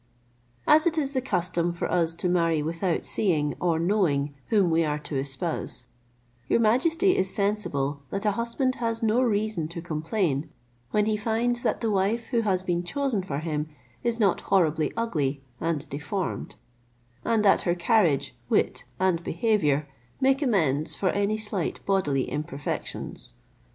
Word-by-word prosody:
As 310 +3 +6
it 330 -1 0
is 280 -2 0
the 260 - +1
custom 175 -6 0
for 170 - -3
us 165 -2 +2
to 180 - -1
marry 165 -3 +2
without 165 +2 -1
seeing 155 -8 +1
or 170 -2 +1
knowing 165 -6 +1
whom 200 -6 +3
we 165 +1 +3
are 150 -1 0
to 150 0 -6
espouse, 135 -1 -3 0.6
your - - +4
majesty 325 - +3
is 190 0 +1
sensible 150 -9 -1
that 200 +2 -3
a 210 - +4
husband 235 +4 0
has 230 -1 -1
no 225 +3 +3
reason 215 -8 0
to 170 +2 -6
complain, 160 -2 -1 0.4
when 210 +6 +2
he 215 0 +1
finds 230 +3 0
that - - 0
the 225 -2 0
wife 205 +4 0
who 235 -3 +2
has 190 -4 +1
been 175 -1 -1
chosen 265 +1 -1
for 150 -7 -4
him 155 0 -2 0.3
is 235 -1 0
not 200 -4 +3
horribly 160 -5 +2
ugly 145 -12 -1 0.2
and 160 -2 -1
deformed, 150 +7 -3 0.7
and 220 -2 +2
that 195 - +5
her 175 -1 +1
carriage, 175 - +2
wit, - - +1
and 180 -3 +1
behaviour 165 -8 +1 0.3
make 270 +1 +3
amends 160 - +2
for 190 - 0
any 205 +1 +1
slight 210 -5 -3
bodily 145 -9 +1
imperfections. 145 - -4
185 Hz, 155 wpm, -26 LUFS, 155-220 Hz, 0.7 s, As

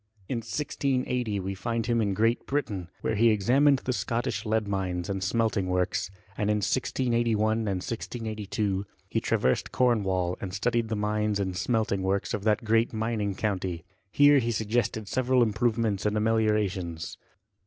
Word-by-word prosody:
In 125 - -2
1680 125 -3 -1
we 95 +1 -3
find 115 +4 -2
him 120 -1 +1
in 100 -3 0
Great 115 +3 +1
Britain, 105 -11 -2
where - - 0
he 115 +2 +4
examined 130 +7 +4
the 130 - 0
Scottish 115 -3 -2
lead 110 -1 +1
mines, 95 -1 -2
and 95 -1 -2
smelting 110 -1 +1
works; 90 0 0 0.3
and 105 +1 -1
in 105 - +3
1681, 115 -1 +1
and 110 - -2 0.2
1682, 110 -4 -3 0.2
he - - -1
traversed 65 - +1
Cornwall, 95 -8 +1
and 95 -1 -4
studied 115 +2 0
the 110 - -2
mines 105 0 0
and 95 -2 -1
smeltingr 110 -1 0
works 95 +1 -1
of 105 - -2
that 110 +2 +2
great 115 +1 +3
mining 110 -3 -1
county; 95 -5 -2 0.3
here 145 +2 +6
he 120 -2 0
suggested 110 -1 -1
several 130 +2 +2
improvements 110 -2 0
and 105 0 0
ameliorations. 105 -6 0
110 Hz, 155 wpm, -27 LUFS, 100-115 Hz, 0.3 s, here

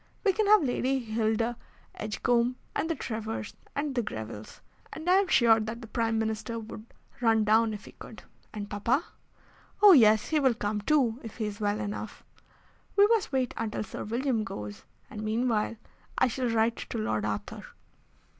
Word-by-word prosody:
We 395 -3 +3
can 425 +2 +1
have 420 -4 +6
Lady 260 0 0
Hilda 225 0 -1 0.4
Edgecombe, 235 +3 0 0.2
and 320 - -1
the 330 - 0
Trevors, 220 -3 -5 0.2
and 285 0 -1
the 245 - +1
Grevilles, 110 - -7 0.3
and 320 +2 -8
I 365 +1 +6
am 395 0 +2
sure 230 -7 +5
that 220 +2 -4
the - - -8
Prime 225 0 0
Minister 220 +1 -2
would 220 0 -8 0.3
run 225 -2 +4
down 220 +1 +3
if 210 -1 -7
he - - -11
could." - - -12 0.3
"And 205 -1 -6
papa?" 230 +9 0 0.7
"Oh, 415 -1 +9
yes; 220 - +6
he 315 - +2
will 260 -4 +3
come 210 0 -2
too, 250 -2 +2
if 225 - -9
he 220 - -2
is 205 0 -5
well 205 0 0
enough. 205 +1 -5 0.7
We 405 - +7
must 455 -8 +2
wait 260 -3 0
until 220 -1 -2
Sir 210 - -7
William 235 +1 -1
goes, 105 - -7 0.2
and, 215 - -8
meanwhile, 220 0 0 0.4
I - - +3
shall 250 +1 -1
write 230 0 +1
to - - -6
Lord 110 -1 -1
Arthur." 105 -1 -4
225 Hz, 175 wpm, -28 LUFS, 215-255 Hz, 0.7 s, Oh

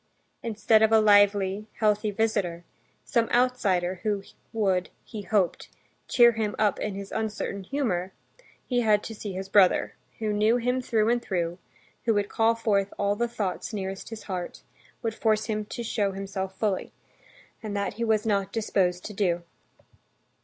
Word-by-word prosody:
Instead 220 -1 +2
of 220 0 +4
a 220 - +7
lively, 205 -1 +4
healthy 210 -1 +1
visitor, 200 -5 -1 0.4
some 230 -2 +1
outsider 195 -8 +1
who 205 -2 -1 0.3
would, 195 -5 +1
he 215 -3 -7
hoped, 200 -3 0 0.4
cheer 240 -1 +6
him 220 -2 -2
up 210 -1 +2
in 210 -2 -3
his 200 0 -7
uncertain 215 -2 -3
humor, 190 -6 -2 0.5
he 245 -2 0
had 215 -3 +3
to 225 - -6
see 205 -2 -6
his 190 +1 -5
brother, 195 -2 +4 0.2
who 215 -2 -1
knew 215 +3 +3
him 250 +2 0
through 220 -3 +1
and 240 +1 +2
through, 175 -4 -2 0.5
who 225 -2 +3
would 205 0 0
call 225 +1 +2
forth 205 -3 +1
all 200 0 +1
the 235 +3 0
thoughts 210 -2 -3
nearest 195 -1 -5
his 225 -2 -8
heart, 180 -3 -5 0.4
would 225 -1 -1
force 220 -1 +1
him 215 -2 -2
to 235 - -6
show 205 -3 0
himself 190 -1 -5
fully. 205 -4 -1 0.7
And 210 -2 -4
that 200 - -1
he 235 - -4
was 220 -2 +1
not 200 -3 0
disposed 185 -5 0
to 210 - -6
do. 175 -4 0
210 Hz, 165 wpm, -27 LUFS, 195-225 Hz, 0.7 s, a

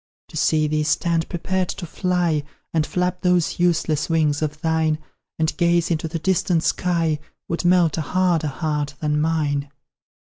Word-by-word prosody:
To - - -12
see 155 -1 +2
thee 155 0 0
stand 165 +2 0
prepared 185 +1 -1
to 180 - -5
fly, 175 -2 0 0.3
And 155 -2 +1
flap 180 0 -1
those 180 -3 +1
useless 160 -3 +1
wings 155 -3 +2
of 150 0 -2
thine, 160 -1 +1 0.4
And 160 0 0
gaze 170 -1 +2
into 160 0 0
the 165 +1 -3
distant 170 -1 +1
sky, 165 -4 +1 0.3
Would 170 - -2
melt 175 -3 +4
a - - +1
harder 175 0 +1
heart 150 -1 -2
than 150 -1 0
mine. 145 -3 0
160 Hz, 155 wpm, -22 LUFS, 155-175 Hz, 0.4 s, melt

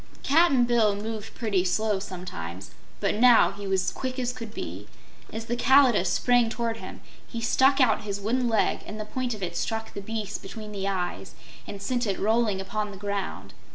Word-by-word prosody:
Cap'n 285 -4 +4
Bill 230 -4 +3
moved 220 +1 -6
pretty 205 -6 0
slowly, 205 +2 +1
sometimes, 140 - -7 0.3
but 200 - +1
now 240 +2 +6
he 200 0 -7
was 190 -1 +1
quick 255 0 -4
as 250 -1 -1
could 230 -4 -8
be. - - -7 0.4
As 225 0 -5
the 240 - -1
Kalidah 255 -6 +5
sprang 245 +5 +3
toward 230 0 -2
him - - -9 0.3
he 230 - -5
stuck 265 +4 +3
out 250 -5 +4
his 200 -1 -4
wooden 240 +4 0
leg 220 -2 +2
and 215 - -7
the 215 - -4
point 245 +2 -3
of 200 - -8
it 170 -1 -3
struck 220 +3 -3
the 200 - -5
beast 215 0 -4
between 210 +2 -8
the 195 -1 -3
eyes 185 -3 -3 0.3
and 200 - -6
sent 245 +1 0
it 195 - -1
rolling 220 -2 +1
upon 210 +2 -3
the 200 - -9
ground. 200 0 -4
215 Hz, 190 wpm, -26 LUFS, 200-240 Hz, 0.4 s, now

